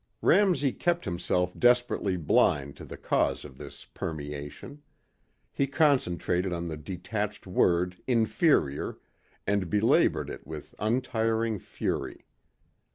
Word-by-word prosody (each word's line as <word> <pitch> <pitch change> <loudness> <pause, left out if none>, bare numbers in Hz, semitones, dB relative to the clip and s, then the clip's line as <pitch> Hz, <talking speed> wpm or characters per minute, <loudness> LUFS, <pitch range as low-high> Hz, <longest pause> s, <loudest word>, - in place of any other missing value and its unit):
Ramsey 175 -10 +4
kept 175 +1 -1
himself 90 0 -1
desperately 120 -6 +2
blind 70 -3 +2
to - - -9
the - - -9
cause - - 0
of 65 -3 -12
this - - -9
permeation. 75 - -7 0.7
He 140 - +1
concentrated 95 - +1
on 85 0 -3
the 80 - -4
detached 100 +6 -4
word 90 -1 +2
"inferior" 115 - +2 0.5
and 100 -3 0
belabored 105 +5 +2
it - - -9
with 75 -2 -8
untiring 115 -1 0
fury. - - -4
100 Hz, 110 wpm, -28 LUFS, 85-120 Hz, 0.7 s, Ramsey